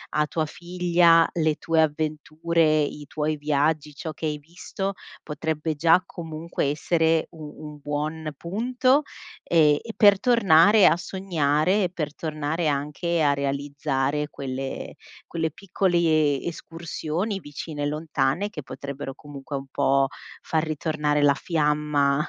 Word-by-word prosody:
a 150 0 +3
tua 155 +1 -1
figlia 170 -1 +3
le 155 -2 +1
tue 165 -1 +1
avventure, 155 +1 +1
i 145 0 -4
tuoi 155 0 -2
viaggi, 150 +1 0
ciò 160 +2 -5
che 160 - -6
hai 150 -1 -1
visto 175 +5 -5 0.3
potrebbe 160 0 -3
già 165 +4 +4
comunque 165 -1 -4
essere 160 +2 +1
u 155 -3 -10 0.2
un 150 - -12
buon 150 +2 -3
punto 255 - +1 0.4
e 150 -3 +4
e 225 -1 -7
per 205 -2 +6
tornare 205 -4 +5
a - - +5
sognare 180 0 0
e 180 - 0
per 155 -4 -4
tornare 155 +1 -2
anche 150 +4 -1
a 145 -1 +4
realizzare 140 +1 -1
quelle 135 -1 -5 0.3
quelle 160 -1 -2
piccole 165 -6 +1
escursioni 170 +3 -4
vicine 145 -1 -6
e - - +1
lontane 150 +4 -1
che 155 -8 -8
potrebbero 135 +1 -7
comunque 145 0 -8
un 135 0 -8
po' 135 0 +2 0.3
far 160 -1 0
ritornare 150 -1 -1
la 140 -1 +5
fiamma 150 -2 +1
155 Hz, 130 wpm, -25 LUFS, 145-170 Hz, 0.4 s, per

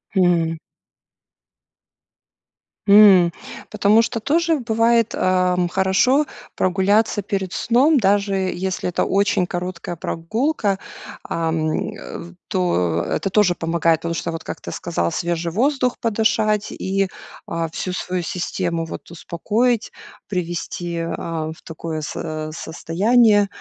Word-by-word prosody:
Мгм. 170 -3 +2 2.3
М, 200 -4 +7 0.4
потому 215 +1 +4
что 230 0 -2
тоже 325 +5 +1
бывает, 230 -1 +2
а, 185 -1 +2
м, 175 -1 +1
хорошо 195 +11 +3 0.3
прогуляться 200 +3 +2
перед 195 -1 -3
сном, 270 +6 +3
даже 200 -2 +2
если 185 -1 -2
это 175 - 0
очень 200 -2 +2
короткая 175 -1 -4
прогулка. 205 - -1 0.5
Ам, 160 -1 -1 0.2
э, - - -8
в 175 +1 -11
то, 90 - +1
это 195 - -1
тоже 190 -3 +3
помогает, 165 -1 +1
потому 170 0 -2
что, 165 0 -3
вот 165 - -6
как - - -6
ты - - -7
сказал 85 0 -2
свежий 170 -1 -2
воздух 250 - +1
подышать. 215 -1 +1
И, 195 0 -1 0.4
а, 165 -1 -2
всю 180 +3 -4
свою 180 -1 -2
систему 170 -1 -2
вот - - -8
успокоить, 220 +8 -1 0.4
привести, 175 -2 -3
а, 165 -1 -3
в - - -20
такое 160 -1 -5
со 145 - -5 0.3
а, - - -8
состояние, 205 +7 +2
185 Hz, 120 wpm, -21 LUFS, 170-215 Hz, 2.3 s, М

